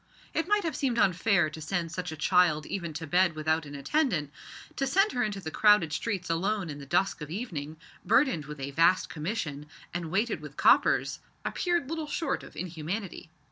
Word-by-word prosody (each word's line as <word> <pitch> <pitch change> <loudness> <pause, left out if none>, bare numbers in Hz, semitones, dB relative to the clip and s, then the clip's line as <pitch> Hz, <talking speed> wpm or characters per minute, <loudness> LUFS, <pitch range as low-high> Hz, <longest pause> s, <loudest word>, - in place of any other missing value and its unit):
It 325 - 0
might 415 +1 +2
have 325 -5 -2
seemed 255 -4 0
unfair 190 -4 +3
to 160 - -8
send 165 +1 -2
such 180 0 -4
a - - -5
child 165 -2 +3
even 170 -4 -4
to 160 +2 -5
bed 175 +2 +3
without 155 0 0
an 145 - -8
attendant. 155 - 0 0.5
To 275 - 0
send 390 +9 +3
her 245 - -1
into 210 -4 -1
the 160 -4 -6
crowded 210 -7 +4
streets 190 0 -2
alone 180 +1 -1
in 145 - -8
the 140 - -10
dusk 190 +3 +1
of 150 - -6
evening, 160 - -5 0.3
burdened 225 - +3
with 150 0 -8
a 135 +1 -4
vast 165 +5 +3
commission, 155 -4 -4 0.3
and 170 -2 -3
weighted 200 -1 0
with 150 -1 -10
coppers, - - +4 0.3
appeared 345 -6 0
little 320 0 -3
short 295 0 -1
of - - -13
inhumanity. 175 +2 -5
180 Hz, 190 wpm, -29 LUFS, 155-225 Hz, 0.5 s, crowded